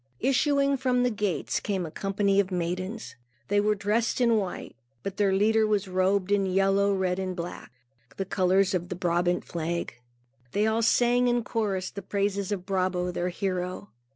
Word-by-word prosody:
Issuing 280 +1 +2
from 250 -1 +1
the 250 - +2
gates 205 -5 -1
came 190 -4 -2
a 160 - -7
company 195 +1 +1
of 195 -2 +2
maidens. 185 +4 -3 0.3
They 205 - +3
were 210 +1 +2
dressed 210 +4 0
in 235 -2 +4
white, 195 -4 -4 0.3
but 195 0 -5
their 200 -2 +3
leader 215 +3 +3
was 205 -2 0
robed 185 +1 +1
in 200 -1 +2
yellow, 195 +1 +2
red, 190 -1 0
and 185 -1 -3
black, 175 0 -7 0.5
the 195 - -2
colors 190 0 +2
of 175 -1 -2
the 180 - -3
Brabant 175 0 0
flag. 170 -1 -3 0.6
They 210 +1 +2
all 220 +1 +1
sang 245 +2 +3
in 240 -1 +1
chorus 205 -5 -2
the 200 - -7
praises 200 0 -1
of 190 -3 -3
Brabo 185 -2 0
their 175 +1 -2
hero. 185 +1 -3
195 Hz, 175 wpm, -27 LUFS, 185-215 Hz, 0.6 s, in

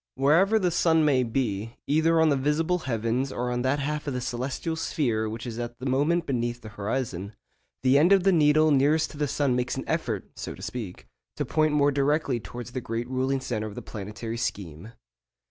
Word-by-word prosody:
Wherever 165 +11 +4
the 185 -4 +1
sun 160 -2 +3
may 135 -4 +3
be, 115 -3 -2
either 160 +2 +3
on 160 -1 +5
the 145 - +3
visible 150 +6 +1
heavens 125 -1 -1
or 125 -1 -2
on 120 0 -1
that 130 +3 +1
half 150 +1 -3
of 140 - -2
the - - -1
celestial 130 +6 -3
sphere 115 -9 -1
which 115 +2 -6
is 120 -1 -5
at 120 0 -5
the 130 - -8
moment 150 +6 +1
beneath 120 -3 -2
the 110 - -9
horizon, 105 -2 -4 0.5
the 130 +2 +5
end 170 +6 +4
of 195 -2 +5
the 195 - +5
needle 155 -2 +4
nearest 145 +3 +3
to - - -11
the 145 0 0
sun 140 -2 +1
makes 125 +1 -1
an 135 - -3
effort 120 - -2
(so - - -6
to - - -13
speak) 110 -8 -6 0.3
to - - -2
point 155 -1 +1
more 145 -1 +4
directly 140 -2 +1
towards 120 +5 -8
the 130 - -4
great 115 +1 -3
ruling 130 +1 0
centre 110 -4 -3
of 105 - -9
the - - -7
planetary 105 +3 -6
scheme. 100 -4 -4
130 Hz, 210 wpm, -26 LUFS, 115-150 Hz, 0.5 s, on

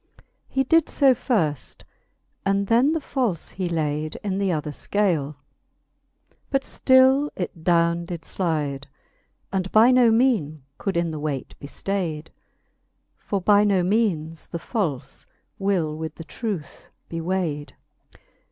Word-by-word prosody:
He 270 - 0
did 325 +4 +3
fo 275 -3 +5
firft; 165 - -1 0.6
and 195 0 +1
then 235 +7 +4
the 325 - 0
falie 250 - -2
he 185 -2 -2
layd 155 -2 -2
In 195 -1 -1
th'other 160 -6 -1
fcale; 160 -4 0 1.1
but 270 -1 +1
ftill 260 +2 +4
it 175 -3 -5
downe 170 0 +2
did 170 -2 -7
Hide, 150 -6 -2 0.7
And 190 -1 -1
by 225 +4 +6
no 250 -2 +6
meanc 220 - +2 0.2
could 195 -4 -2
in 170 -1 0
the 155 - -5
weight 145 -3 -4
be 140 - -8
ftayd. 165 -3 -3 0.9
For 200 - -3
by 205 +2 +5
no 195 -3 +3
meanes 175 -6 0
the 170 - -5
falle 170 - -2 0.6
will 180 -6 0
with 160 0 -5
the 165 - -8
truth 195 -3 -6 0.2
be 165 0 -4
wayd. 165 -5 -2
180 Hz, 135 wpm, -24 LUFS, 155-215 Hz, 1.1 s, by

